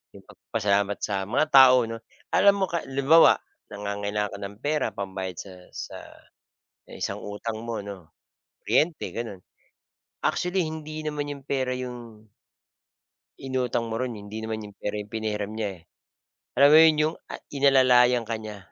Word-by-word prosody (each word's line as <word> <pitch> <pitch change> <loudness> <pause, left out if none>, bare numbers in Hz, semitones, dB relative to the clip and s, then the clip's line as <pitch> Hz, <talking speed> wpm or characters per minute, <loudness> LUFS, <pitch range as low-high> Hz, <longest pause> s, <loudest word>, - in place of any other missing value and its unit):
'Yong - - -13
magpasalamat 100 -2 -1
sa 105 - -1
mga 155 - +2
tao 130 -2 +8
'no, 115 0 -5 0.3
alam 200 0 +5
mo 195 -1 +1
ka 170 - 0
lu 135 +1 -3
limbawa 160 +4 +7 0.3
nangangailangan 100 0 -3
ka - - -7
ng 100 0 -7
pera 145 -8 -1
pambayad 95 -2 -5
sa 95 - -8 0.2
sa, - - -6 1.0
isang - - -4
utang 110 +2 -5
mo 115 -3 -3
'no, 100 -5 -10 0.5
kuryente 160 +1 +1
gano'n. 115 -5 -6 0.9
Actually 180 0 0
hindi 155 0 -6
naman 150 -1 -3
'yong 140 -2 -8
pera 130 -2 -1
'yong. 120 -4 -8 1.1
Inutang 125 -3 -2
mo 115 - -4
ro'n 125 -4 -3
hindi 105 +2 -8
naman 110 0 -4
yung 105 - -14
pera 105 +1 -3
yung 105 0 -8
pinahiram 105 -2 -3
niya. 100 -6 -5 0.7
Alam 140 +2 +7
mo 155 - +9
'yun 160 -2 +5
'yung 155 +2 0 0.2
a - - -4 0.2
inalalayan 130 -3 +5
ka 115 - 0
niya. 105 -1 -7
115 Hz, 155 wpm, -26 LUFS, 105-140 Hz, 1.1 s, mo